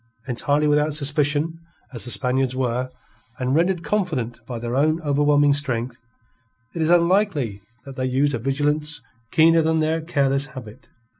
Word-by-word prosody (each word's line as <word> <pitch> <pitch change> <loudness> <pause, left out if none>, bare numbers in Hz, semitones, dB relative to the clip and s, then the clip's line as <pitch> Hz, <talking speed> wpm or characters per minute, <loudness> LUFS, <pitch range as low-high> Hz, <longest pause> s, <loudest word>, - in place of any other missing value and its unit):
Entirely 145 +4 +1
without 150 0 +2
suspicion 150 +2 0 0.3
as 120 - -4
the - - -5
Spaniards 125 +4 0
were, 130 0 -1 0.5
and 130 -1 -1
rendered 170 +2 +1
confident 145 - -2
by 120 - -5
their 120 +1 -4
own 155 +4 +2
overwhelming 145 0 +3
strength, 125 -4 -3 0.7
it 170 - -4
is 160 - +1
unlikely 170 - +2 0.2
that 135 -1 -10
they 130 0 -1
used 140 +3 +1
a 120 - -2
vigilance 150 +4 -1 0.3
keener 165 +1 +5
than 160 0 +1
their 160 +1 0
careless 140 -3 0
habit. 115 -2 -11
145 Hz, 150 wpm, -22 LUFS, 130-155 Hz, 0.7 s, keener